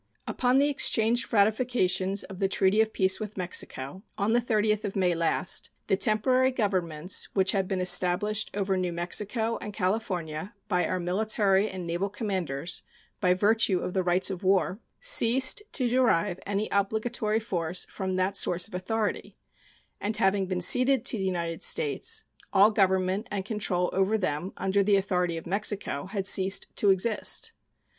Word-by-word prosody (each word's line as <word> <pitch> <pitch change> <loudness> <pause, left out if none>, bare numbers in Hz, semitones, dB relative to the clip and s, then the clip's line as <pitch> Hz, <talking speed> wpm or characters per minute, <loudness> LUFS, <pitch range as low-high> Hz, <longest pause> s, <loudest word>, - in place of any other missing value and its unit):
Upon 250 +1 +1
the 280 +1 +4
exchange 240 -4 +2
of - - -17
ratifications 200 -3 +1
of 190 -1 -10
the 195 - +1
treaty 195 +2 +2
of 220 0 0
peace 190 -2 +2
with 215 -1 -7
Mexico, 180 -3 -2 0.2
on 205 +3 0
the 240 - +3
30th 215 -2 0
of 205 -2 -4
May 185 -3 +1
last, 165 +2 0 0.2
the - - +1
temporary 255 +6 +2
governments 185 -8 -1
which 190 -1 +3
had 195 -2 -1
been 190 -1 -2
established 180 +4 +2
over 195 -1 -1
New 180 -1 -2
Mexico 210 +7 -1
and 210 - -6
California 185 -3 -3
by 180 -3 0
our 185 - -2
military 200 +2 +1
and 185 -2 -7
naval 175 +4 -2
commanders 180 - -2 0.4
by 180 0 +2
virtue 205 0 +2
of 180 - -4
the 190 - +1
rights 180 +2 +2
of 185 -1 -6
war 190 +1 +1 0.2
ceased 265 - +4
to 255 -4 0
derive 215 -7 +1
any 205 +1 -1
obligatory 215 +2 -1
force 180 -5 -3
from 190 -2 -4
that 185 +2 -1
source 180 -2 +1
of 215 - -20
authority, 210 +4 -3 0.6
and 210 +1 -1
having 195 -2 +1
been 180 -1 -3
ceded 255 +5 +3
to 245 - 0
the - - -2
United 170 -3 -3
States, 450 0 +1 0.3
all 200 +2 +5
government 190 0 +1
and 195 -2 -4
control 195 -5 -1
over 195 +3 +1
them 180 -1 -3
under 195 +1 +1
the 200 +1 +3
authority 180 -3 0
of 165 - -8
Mexico 195 -4 -2
had 195 0 -4
ceased 190 0 +3
to 205 - +2
exist. 220 - +2
195 Hz, 165 wpm, -27 LUFS, 185-215 Hz, 0.6 s, all